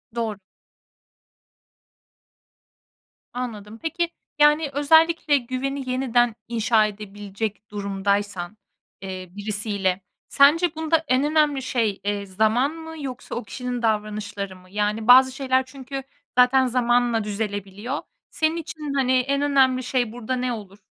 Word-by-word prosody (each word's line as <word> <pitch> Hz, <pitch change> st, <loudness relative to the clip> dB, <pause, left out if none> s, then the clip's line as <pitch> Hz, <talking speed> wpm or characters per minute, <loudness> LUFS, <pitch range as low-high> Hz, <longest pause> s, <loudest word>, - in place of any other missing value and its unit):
Doğru. 225 Hz, -3 st, -2 dB, 3.0 s
Anladım. 225 Hz, -3 st, -6 dB
Peki, 335 Hz, +1 st, -1 dB, 0.3 s
yani, 295 Hz, 0 st, +5 dB
özellikle 320 Hz, +1 st, +4 dB
güveni 260 Hz, +1 st, -4 dB
yeniden 245 Hz, -2 st, +2 dB
inşa 225 Hz, -1 st, +3 dB
edebilecek 205 Hz, +1 st, -6 dB
durumdaysan, 200 Hz, -1 st, -2 dB, 0.4 s
eee, 185 Hz, -1 st, -6 dB
birisiyle, 205 Hz, -2 st, -1 dB, 0.3 s
sence, 315 Hz, +4 st, +4 dB
bunda 320 Hz, 0 st, +1 dB
en 255 Hz, +1 st, +3 dB
önemli 300 Hz, -2 st, +2 dB
şey, 230 Hz, -6 st, -1 dB
eee, 205 Hz, 0 st, -2 dB
zaman 220 Hz, +8 st, +1 dB
mı 320 Hz, -1 st, -9 dB
yoksa 255 Hz, -2 st, -6 dB
o 240 Hz, -, -3 dB
kişinin 250 Hz, +2 st, -5 dB
davranışları 210 Hz, -3 st, -2 dB
mı? 185 Hz, 0 st, -18 dB
Yani, 210 Hz, +2 st, -1 dB
bazı 260 Hz, +1 st, +8 dB
şeyler 260 Hz, -1 st, +1 dB
çünkü 270 Hz, +1 st, -7 dB, 0.4 s
zaten 260 Hz, +1 st, +5 dB
zamanla 240 Hz, -2 st, +2 dB
düzelebiliyor. 205 Hz, +4 st, -4 dB, 0.3 s
Senin 315 Hz, +1 st, +1 dB
için, 315 Hz, -3 st, -5 dB
hani, 265 Hz, -2 st, +1 dB
en 275 Hz, +2 st, 0 dB
önemli 265 Hz, -3 st, +3 dB
şey 245 Hz, -3 st, 0 dB
burada 245 Hz, +2 st, -3 dB
ne 250 Hz, 0 st, -1 dB
olur? 205 Hz, -3 st, -9 dB
245 Hz, 115 wpm, -23 LUFS, 210-275 Hz, 3.0 s, bazı